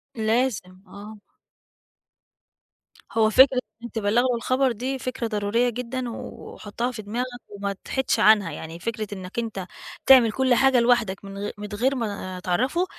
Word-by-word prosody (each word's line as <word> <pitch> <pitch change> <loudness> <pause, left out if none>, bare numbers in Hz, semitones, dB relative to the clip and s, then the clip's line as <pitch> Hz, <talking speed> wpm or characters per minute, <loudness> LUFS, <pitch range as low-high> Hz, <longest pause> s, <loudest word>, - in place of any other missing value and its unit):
لازم 220 -5 -1
آه. 205 +3 -11 1.9
هو 220 -1 +3
فكرة 260 +3 +6 0.2
أنت 235 - -9
تبلّغه 230 +4 +2
الخبر 255 +3 +1
دي 255 +4 -3
فكرة 250 -2 -3
ضرورية 215 +3 0
جدًا 250 +1 -4
وحُطّها 230 +1 -6
في 220 -3 -7
دماغك 230 +5 -3 0.2
وما 200 -1 -4
تحيدش 265 -4 -1
عنها، 210 -6 +5
يعني 160 +2 -8
فكرة 220 +2 -4
إنك 190 +2 -6
أنت 220 -5 -4 0.4
تعمل 255 -4 +7
كلّ 260 +2 +2
حاجة 270 0 +4
لوحدك 235 -5 +1
من 195 0 -8
غ 205 +1 -3
من 210 0 -6
غير 255 +6 +1
ما 200 -6 -4
تعرّفه، 255 - 0
225 Hz, 145 wpm, -24 LUFS, 205-250 Hz, 1.9 s, تعمل